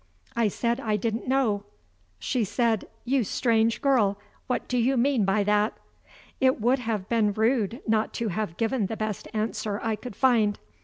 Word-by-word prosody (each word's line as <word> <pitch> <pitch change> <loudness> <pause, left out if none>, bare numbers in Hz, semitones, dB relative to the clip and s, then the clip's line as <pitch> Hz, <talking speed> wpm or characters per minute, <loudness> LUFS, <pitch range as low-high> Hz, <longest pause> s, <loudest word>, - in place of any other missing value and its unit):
I 235 -2 +3
said 235 +4 -1
I 220 -5 0
didn't 225 +3 -2
know. 245 -6 +1 0.5
She 225 - -1
said: 220 +1 0 0.2
"You 260 0 +2
strange 225 +2 +1
girl, 225 -8 +3 0.3
what 250 - -2
do 250 - 0
you 255 +3 +2
mean 245 -3 +2
by 195 +2 +2
that?" 210 +2 +1 0.6
It 260 -2 +3
would 245 +5 +2
have 220 -5 -3
been 220 -3 +2
rude 225 +1 +1
not 220 0 +1
to 230 -2 -1
have 190 -2 -3
given 225 -2 0
the 220 - -5
best 215 -2 -3
answer 215 -1 -2
I 225 -1 0
could 220 0 -9
find. 225 -5 +3
225 Hz, 170 wpm, -26 LUFS, 210-245 Hz, 0.6 s, I